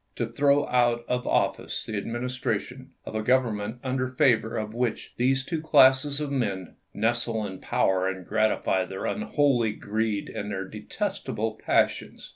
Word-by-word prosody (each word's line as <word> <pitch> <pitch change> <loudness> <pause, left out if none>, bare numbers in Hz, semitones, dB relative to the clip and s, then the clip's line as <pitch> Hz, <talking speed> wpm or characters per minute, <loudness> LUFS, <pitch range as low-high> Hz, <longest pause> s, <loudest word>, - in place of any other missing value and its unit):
to 120 - -1
throw 140 +5 +2
out 120 -1 +2
of 125 0 -1
office - - 0
the 110 - -5
administration 125 +3 -3 0.2
of - - -7
a 110 - -1
Gov 130 +4 +4
ernment 105 0 -4
under 130 -1 -1
favor 125 -4 +2
of 110 -1 -4
which 120 0 -2
these 130 +2 +2
two 160 +2 -3
classes 140 -1 +5
of 150 -2 -3
men 100 -9 -2
" - - -47
nestle 115 0 0
in 95 -2 -7
power 95 -1 +1
and 95 -1 -4
gratify 110 -2 +1
their 95 +1 -6
unholy 140 - +1
greed 105 -1 -2
and 105 - -5
their 95 -2 -3
detestable 115 - -3
passions." - - 0
120 Hz, 160 wpm, -26 LUFS, 105-130 Hz, 0.2 s, classes